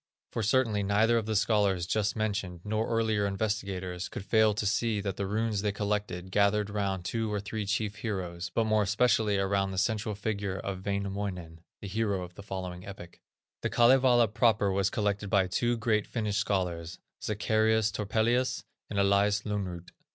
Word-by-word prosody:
For 115 - -2
certainly 110 -1 +2
neither 105 +4 +3
of 110 - -6
the 110 - -1
scholars 100 -4 +2
just 105 +3 0
mentioned, 100 -5 -2
nor 110 +1 -1
earlier 110 -3 +1
investigators, 95 -3 -3
could 95 - -7
fail 110 +1 +4
to 105 - -2
see 110 +1 +1
that 100 -2 -3
the 100 -1 -3
runes 110 0 0
they 105 0 0
collected, 100 -3 -3
gathered 100 +1 +2
round 100 -3 -2
two 115 0 -1
or 105 - -1
three 105 +1 -4
chief 105 +1 -1
heroes, 90 -5 -4
but 115 - +1
more 110 -1 +3
especially 105 0 +2
around 95 0 +1
the 95 - -5
central 105 +2 0
figure 100 -2 -3
of 95 -1 -5
Wainamoinen, 100 -4 -3 0.2
the 100 - -6
hero 100 -2 -1
of 90 0 -10
the 100 - -10
following 95 -3 -6
epic. 95 -3 -10 0.4
The - - -1
Kalevala 120 -1 +5
proper 110 -2 +2
was 100 0 +1
collected 105 -1 -1
by 95 -1 +3
two 120 +6 0
great 110 -2 +1
Finnish 105 -3 -2
scholars, 90 -4 -1 0.3
Zacharias 110 +1 +2
Topelius 115 +4 0 0.3
and 100 - -4
Elias 100 +1 +3
Lönnrot. 95 -5 -4
105 Hz, 170 wpm, -29 LUFS, 95-110 Hz, 0.4 s, Kalevala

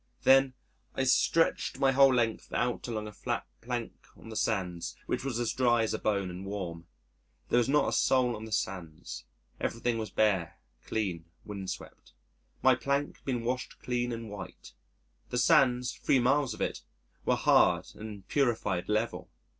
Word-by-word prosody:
Then 135 -1 +5 0.4
I 130 - +1
stretched 150 +5 +2
my 135 0 +3
whole 135 0 +6
length 115 -3 0
out 120 +1 -1
along 110 -3 -3
a - - -7
flat - - -3 0.2
plank - - -5
on - - -12
the 110 - -7
sands, 90 -6 -1
which - - -2
was 130 -4 -2
as 120 -2 0
dry 120 -3 +3
as 110 - -1
a 110 - -2
bone 100 -3 0
and 90 +2 -7
warm. 90 -5 -5 0.6
There 120 - +4
was 120 - +1
not 145 +1 +3
a - - -3
soul 125 -2 +3
on 110 +1 -7
the 110 - -10
sands. 90 -6 -4 0.3
Everything 115 0 -1
was 110 - -4
bare, 95 -6 +1 0.3
clean, 95 -7 -2 0.2
windswept. 100 -3 -7 0.5
My 130 - +7
plank 140 +4 -1
had - - -31
been 125 -4 -1
washed 125 +2 -3
clean 120 0 -2
and 115 -1 -5
white. 100 -2 -9 0.6
The - - -2
sands 125 -1 +4
3 135 - +2
miles 130 +2 +2
of - - -9
it - - -2 0.4
were - - +2
hard - - +4
and 105 -3 -9
purified, 115 -10 0
level. 110 +2 -1
115 Hz, 170 wpm, -30 LUFS, 105-125 Hz, 0.6 s, My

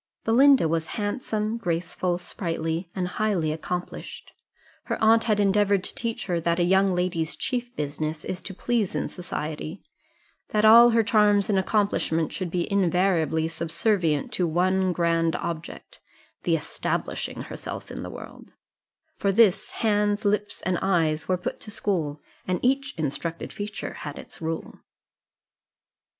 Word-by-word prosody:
Belinda 260 - +6
was 160 0 -1
handsome, 215 0 -2
graceful, 175 -1 -1
sprightly, 165 -1 -3
and 185 -2 -1
highly 180 -5 0
accomplished; 175 +3 -5 0.5
her - - -2
aunt 225 +1 +5
had 215 -3 +2
endeavoured 200 -1 +3
to - - -5
teach 230 -1 -3
her 175 -3 0
that 170 +1 0
a 175 - +2
young 190 +1 +3
lady's 180 -3 -1
chief 245 -1 -3
business 155 +2 -3
is 185 - -4
to 195 - -7
please 230 -2 0
in - - -1
society, 160 -1 -5 0.7
that 210 0 +2
all 235 +2 +9
her 230 -1 +3
charms 210 -2 +3
and 195 - +3
accomplishments 190 -5 0
should 185 -2 -3
be 175 0 -1
invariably 180 -4 +2
subservient 165 -1 0
to 180 - +1
one 185 +3 +2
grand 165 -1 +1
object 170 -1 -6 0.5
the - - +3
establishing - - -3
herself - - -7
in - - -6
the - - -6
world: - - -11 0.7
"For 200 - +1
this, 200 -2 +4
hands, 210 -1 +1
lips, 205 0 0
and 180 -1 0
eyes 160 -5 +1
were 185 - +2
put 180 - -4
to - - -8
school, 165 -8 -2 0.3
And 185 -1 0
each 270 +2 +1
instructed 160 +2 -3
feature 205 0 -5
had 145 -2 -7
its - - -11
rule." 160 0 -4
185 Hz, 145 wpm, -25 LUFS, 165-210 Hz, 0.7 s, all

